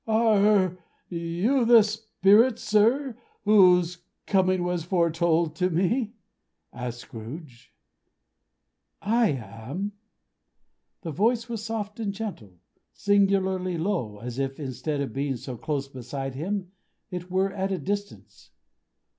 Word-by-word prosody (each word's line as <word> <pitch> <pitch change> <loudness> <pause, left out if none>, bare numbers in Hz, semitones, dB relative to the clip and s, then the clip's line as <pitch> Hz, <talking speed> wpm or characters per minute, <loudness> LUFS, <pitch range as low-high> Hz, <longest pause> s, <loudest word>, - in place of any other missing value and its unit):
"Are 210 -4 +3 0.3
you 175 +10 0
the 230 -1 +7
Spirit, 215 +2 +3
sir, 230 +5 +2 0.3
whose 180 -4 +5 0.3
coming 185 -2 +2
was 175 -2 -1
foretold 170 -2 +1
to 180 +2 +1
me?" 210 +7 0 0.6
asked 120 -1 -5
Scrooge. 125 +2 -10 1.3
"I 230 +2 +2
am!" 130 - -4 1.1
The 165 - -4
voice 230 - +1
was 230 -3 -5
soft 215 -1 -4
and 210 -3 -1
gentle. 195 - -7 0.4
Singularly 190 -3 +1
low, 160 - -2
as 120 +4 -6
if 135 +1 -2
instead 140 +1 -3
of 135 -6 -4
being 135 0 -1
so 125 +1 -7
close 140 +3 -3
beside 135 +1 -6
him, 185 +6 -3 0.4
it 180 0 -6
were 190 +1 +1
at 195 -1 -2
a 190 - 0
distance. 165 - -5
180 Hz, 115 wpm, -26 LUFS, 140-210 Hz, 1.3 s, the